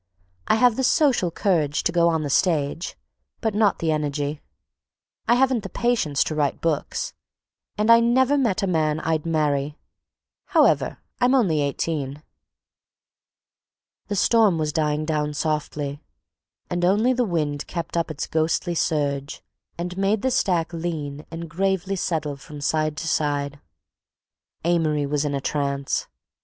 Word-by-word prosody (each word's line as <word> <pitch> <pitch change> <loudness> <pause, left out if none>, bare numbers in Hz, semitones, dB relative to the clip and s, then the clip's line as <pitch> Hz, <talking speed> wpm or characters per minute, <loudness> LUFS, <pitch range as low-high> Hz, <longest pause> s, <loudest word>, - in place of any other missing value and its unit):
I - - +4
have 235 0 +4
the 265 - 0
social 255 - +3
courage 160 -5 0
to - - +1
go 170 0 +3
on 160 -2 0
the 145 - -3
stage, 160 0 0 0.4
but 220 -3 -1
not 205 -2 +3
the 160 -1 0
energy; 150 -1 -2 0.9
I 235 - +5
haven't 260 -2 +2
the 195 - -7
patience 185 - +1
to - - -3
write 150 -2 0
books; 160 -3 -2 0.6
and 215 +2 +3
I 230 - +8
never 255 +4 +3
met 230 -8 +1
a - - +3
man 155 -4 +1
I'd 160 0 -1
marry. 150 -2 0 0.7
However, - - +3 0.2
I'm 250 +2 +4
only 175 - +2
eighteen." 145 0 -2 1.8
The 205 - -2
storm 210 -2 +4
was 155 -1 -1
dying 150 -1 0
down 150 -1 -1
softly 145 -1 -2 0.7
and 175 0 -2
only 210 +8 +3
the 250 0 +1
wind 155 -8 -2
kept 170 -1 -5
up 170 -1 0
its 150 -2 -4
ghostly 160 +2 0
surge 145 -3 -1 0.3
and 175 +1 -4
made 195 +2 +1
the 260 - +1
stack 175 -7 +1
lean 155 -3 -4
and 165 0 -6
gravely 190 +3 -1
settle 155 -5 -2
from 150 +1 -10
side 155 +1 0
to 165 - -4
side. 145 -2 -1 1.1
Amory 160 -4 +1
was 145 +1 -1
in 145 -1 -1
a 140 - -2
trance. 140 -1 -1
160 Hz, 150 wpm, -23 LUFS, 150-195 Hz, 1.8 s, I